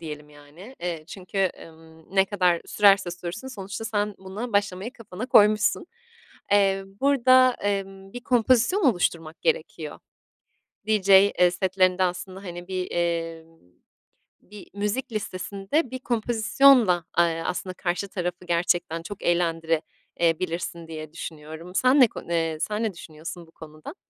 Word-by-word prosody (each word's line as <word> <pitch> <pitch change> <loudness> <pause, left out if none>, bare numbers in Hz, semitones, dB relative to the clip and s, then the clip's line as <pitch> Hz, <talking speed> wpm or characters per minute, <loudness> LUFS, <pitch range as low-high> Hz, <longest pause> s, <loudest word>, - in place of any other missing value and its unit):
diyelim 150 -2 -8
yani. 150 - -14
Eee, 170 -3 -4
çünkü, 190 0 -2 0.2
ımm, 160 +2 -17
ne 190 - +6
kadar 180 -4 +1
sürerse 195 -3 +4
sürsün 180 +8 -7
sonuçta 200 -3 -7
sen 210 -1 -1
buna 200 +6 -7
başlamayı 205 +3 -1
kafana 230 -1 -8
koymuşsun. 210 +2 +4 0.6
Emm, 195 -1 +2
burada, 255 -2 +5
emm, 195 -1 -3
bir 245 - -7
kompozisyon 245 - +2
oluşturmak 170 - 0
gerekiyor. 485 0 -2 0.9
DJ, 210 -3 0 0.3
eee, 180 0 +5
setlerinde 185 0 +1
aslında, 185 +2 -3
hani, 175 -1 -8
bir, 185 -1 -3
emm, 165 -1 -3 0.8
bir 205 -2 -13
müzik 210 +5 -2
listesinde 205 - -2
bir 260 - -5
kompozisyonla, 235 -4 +3
aaa, 165 -1 +2
aslında 185 0 -4
karşı 180 +2 -2
tarafı 180 -2 -4
gerçekten 170 -1 0
çok 200 +3 -9
eğlendire, 165 -2 +1 0.4
eee, 165 -2 +3
bilirsin 170 -1 -4
diye 155 -1 -8
düşünüyorum. 160 +2 -9
Sen 255 +6 +4
ne 255 - +9
konu 170 - -8
eee, 165 -2 0
sen 210 +4 -2
ne 220 -3 -1
düşünüyorsun 165 +1 -9
bu - - -21
konuda? 155 - -11
185 Hz, 135 wpm, -25 LUFS, 170-210 Hz, 0.9 s, ne